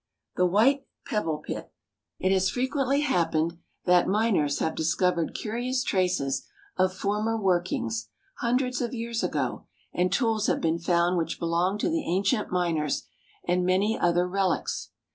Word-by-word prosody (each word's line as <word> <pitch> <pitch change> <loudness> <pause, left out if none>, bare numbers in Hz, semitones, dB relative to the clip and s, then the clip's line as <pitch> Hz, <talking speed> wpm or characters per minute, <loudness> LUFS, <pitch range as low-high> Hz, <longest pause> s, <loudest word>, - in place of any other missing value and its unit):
=The 180 - +3
White 260 +9 +3 0.2
Pebble 165 -8 -1
Pit.= - - -5 0.5
It 185 - +1
has 190 0 +3
frequently 270 +3 0
happened 170 - +1 0.3
that 180 -1 +4
miners 195 -9 +2
have 160 - 0
discovered 170 +1 0
curious 245 +4 -2
traces 180 -8 0 0.3
of 185 0 +2
former 210 +3 0
workings, 175 - 0 0.3
hundreds 250 +1 0
of 240 0 -2
years 230 0 -2
ago, - - -2 0.3
and 180 0 +1
tools 220 0 +1
have - - +1
been 165 0 0
found 175 +1 +2
which 165 - -2
belonged 175 +5 0
to - - +1
the 325 -1 0
ancient 195 +4 +1
miners, 165 -5 0 0.4
and 180 +1 +2
many 190 +4 +2
other 175 +1 +2
relics. 190 -1 -1
185 Hz, 145 wpm, -27 LUFS, 170-225 Hz, 0.5 s, that